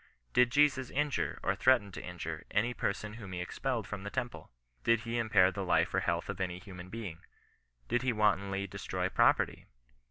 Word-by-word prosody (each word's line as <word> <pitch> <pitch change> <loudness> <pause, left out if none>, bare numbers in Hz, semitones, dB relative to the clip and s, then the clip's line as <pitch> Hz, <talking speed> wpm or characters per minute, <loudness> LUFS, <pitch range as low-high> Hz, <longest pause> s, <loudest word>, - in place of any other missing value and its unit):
Did 125 0 +5
Jesus 135 -2 +3
injure, 145 0 0
or - - +2
threaten 120 -6 +3
to - - -7
injure, 85 -3 -5
any 115 +4 +1
person 105 -1 -2
whom 100 -4 -8
he 90 - -3
expelled 90 - -2
from 100 -2 -6
the 100 - -5
temple? 120 +4 -4 0.3
Did 115 -1 +3
he 115 +1 -2
impair 100 -5 +4
the 95 +1 -4
life 90 - +2
or - - +3
health - - -1
of - - -4
any 90 -1 -2
human 90 -1 -10
being? 100 -7 -6 0.7
Did 120 +1 +1
he 130 0 +1
wantonly 100 -3 +1
destroy 95 - -3
property - - +2
105 Hz, 185 wpm, -32 LUFS, 95-120 Hz, 0.7 s, Did